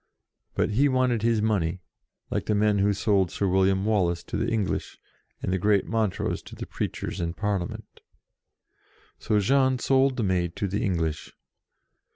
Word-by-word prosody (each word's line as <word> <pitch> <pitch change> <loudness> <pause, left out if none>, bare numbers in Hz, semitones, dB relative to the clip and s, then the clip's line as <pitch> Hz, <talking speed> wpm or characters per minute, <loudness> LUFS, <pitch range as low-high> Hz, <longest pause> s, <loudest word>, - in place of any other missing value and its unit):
But - - +1
he 140 +7 +3
wanted 130 -3 +1
his 115 -1 +2
money, 95 -5 0 0.5
like - - -2
the 105 - +2
men 105 0 +2
who 100 +1 +3
sold 100 -2 +1
Sir 100 - -1
William 95 +1 +2
Wallace 90 -6 +1
to - - -6
the - - 0
English, 110 -4 -2 0.5
and 95 - -1
the 95 - 0
great 100 +1 +2
Montrose 110 -4 -1
to - - -12
the - - -6
preachers - - -4
and 85 0 -3
Parliament. 100 -4 -3 1.2
So 105 -2 +1
Jean 130 +4 +3
sold 135 +1 +2
the 115 - 0
Maid 90 -3 0
to 100 - -2
the 100 +3 -2
English. 80 -5 -2
105 Hz, 165 wpm, -26 LUFS, 95-110 Hz, 1.2 s, he